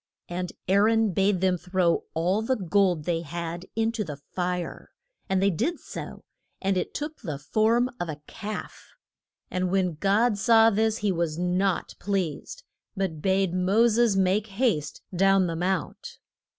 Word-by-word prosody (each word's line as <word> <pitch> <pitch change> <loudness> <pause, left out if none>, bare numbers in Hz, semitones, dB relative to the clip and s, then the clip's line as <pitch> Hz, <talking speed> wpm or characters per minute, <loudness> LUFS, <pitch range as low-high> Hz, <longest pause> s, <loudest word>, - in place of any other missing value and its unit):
And 180 +1 -4 0.2
Aa 190 +2 +4
ron 220 +1 +3
bade 195 0 +1
them 185 -2 +2
throw 180 -1 +1
all 180 +6 +1
the 260 +4 0
gold 190 -5 +1
they 165 +1 -1
had 170 +2 -5
in 225 0 +1
to 225 -2 -2
the 150 -6 -7
fire. 180 +4 -4 0.4
And 190 0 +2
they 200 - +4
did 315 - -1
so, - - -8 0.4
and 195 0 0
it 180 - -2
took 300 +1 -5
the 155 -10 -4
form 220 - +2
of 175 - -3
a 150 -1 -5
calf. 215 -1 -8 0.6
And 185 0 0
when 185 -2 +1
God 205 +3 +2
saw 225 0 +6
this 220 +1 +1
he 200 - +3
was 165 -3 -1
not 180 +1 0
pleased, 185 -7 -3 0.3
but 175 -6 -2
bade 190 -1 +1
Mo 195 +6 +3
ses 230 -3 +3
make 195 +3 +2
haste 195 - -1
down 195 +1 +4
the 165 -1 -2
mount. 180 +1 -3
190 Hz, 165 wpm, -26 LUFS, 175-215 Hz, 0.6 s, saw